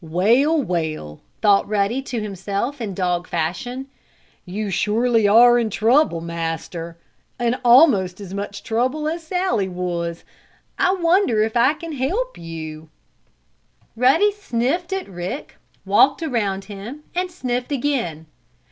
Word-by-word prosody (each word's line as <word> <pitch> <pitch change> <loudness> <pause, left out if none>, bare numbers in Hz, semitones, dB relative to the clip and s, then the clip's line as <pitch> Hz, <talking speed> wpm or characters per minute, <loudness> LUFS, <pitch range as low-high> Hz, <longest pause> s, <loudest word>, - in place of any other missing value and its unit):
"Well, 230 - +3
well!" 160 - -3 0.2
thought 205 -2 +4
Ruddy 210 +5 0
to 250 -3 -4
himself, 205 +6 -3 0.2
dog 175 -2 -1
fashion. 175 +11 -3 0.6
"You 205 +2 -3
surely 225 +3 +2
are 240 +3 +7
in 230 -2 0
trouble, 220 - +2
Master! 165 0 -5 0.4
In 240 +1 +1
almost 235 - +5
as 195 -2 -8
much 200 0 -5
trouble 260 +7 -1
as 330 +2 -2
Sallie 325 - -1
was! 175 -2 -3 0.6
I 370 - +3
wonder 335 - +3
if 220 +1 -3
I 255 +6 +4
can 330 +1 -8
help 360 - -2
you?" 160 -1 -8 1.1
Ruddy 270 - +4
sniffed 345 - -2
at 385 0 -3
Rick, 180 +8 -6 0.3
walked 235 - +4
around 205 -9 -1
him 215 +9 -8
and 360 +1 -1
sniffed 250 -7 -3
again. 240 - -1
225 Hz, 125 wpm, -21 LUFS, 180-280 Hz, 1.1 s, are